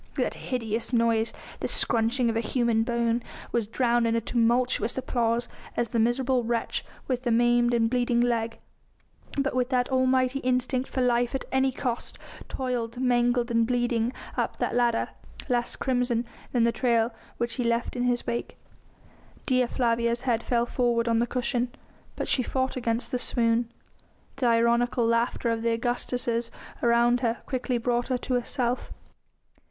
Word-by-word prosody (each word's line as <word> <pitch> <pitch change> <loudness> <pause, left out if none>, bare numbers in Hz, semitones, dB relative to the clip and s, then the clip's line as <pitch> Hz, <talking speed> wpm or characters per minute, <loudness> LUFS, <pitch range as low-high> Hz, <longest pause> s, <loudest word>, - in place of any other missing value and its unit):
That - - 0
hideous 230 -2 -3
noise 230 -2 +2 0.3
the - - -2
scrunching 235 +2 +2
of 225 - 0
a - - +2
human 235 -1 +1
bone 235 0 0 0.3
was 230 -3 0
drowned 235 0 +2
in 230 0 +2
tumultuous 240 +1 +1
applause 240 -2 0 0.3
as 235 - 0
the 235 - 0
miserable 245 +2 +2
wretch 230 0 -1 0.2
with 255 -2 -1
the 250 - -1
maimed 240 +1 +3
and 230 -1 +3
bleeding 245 0 +1
leg, 235 -2 0 0.8
but 275 -1 0
with 250 0 +1
that 250 -2 +1
almighty 260 0 +2
instinct 255 0 0
for 260 - -1
life 245 0 +2
at 270 - -3
any 265 0 +2
cost, 245 -2 -4 0.3
toiled 245 -2 -3
mangled 245 -1 +2
and 230 -1 +3
bleeding 240 -1 +1 0.2
up - - -1
that - - -1
ladder 240 -1 +2 0.4
less 240 -1 0
crimson 245 -2 0 0.3
than 240 -2 +2
the 235 - +4
trail 235 -1 +1 0.2
which 235 0 -2
he 250 - 0
left 235 +1 0
in 245 - -2
his 245 -1 0
wake. 235 - -3 0.9
Dea 255 -2 +2
Flavia's 235 0 0
head 235 -3 +1
fell 235 0 +1
forward 240 -1 +1
on 230 -1 +3
the 240 - +1
cushion. 245 0 -1 0.5
But - - -3
she 260 - +3
fought 260 +1 -1
against 235 -1 -1
the 250 - 0
swoon. 230 -1 +1 0.7
The 260 -2 +1
ironical 235 +1 +3
laughter 230 +1 +1
of 225 0 -1
the 230 0 +1
Augustas 240 -1 -1 0.3
round 235 +1 +4
her 235 -2 -1
quickly 255 -2 -1
brought 240 +1 0
her 255 - 0
to 255 +1 -4
herself. 245 0 -1
240 Hz, 160 wpm, -27 LUFS, 235-250 Hz, 0.9 s, the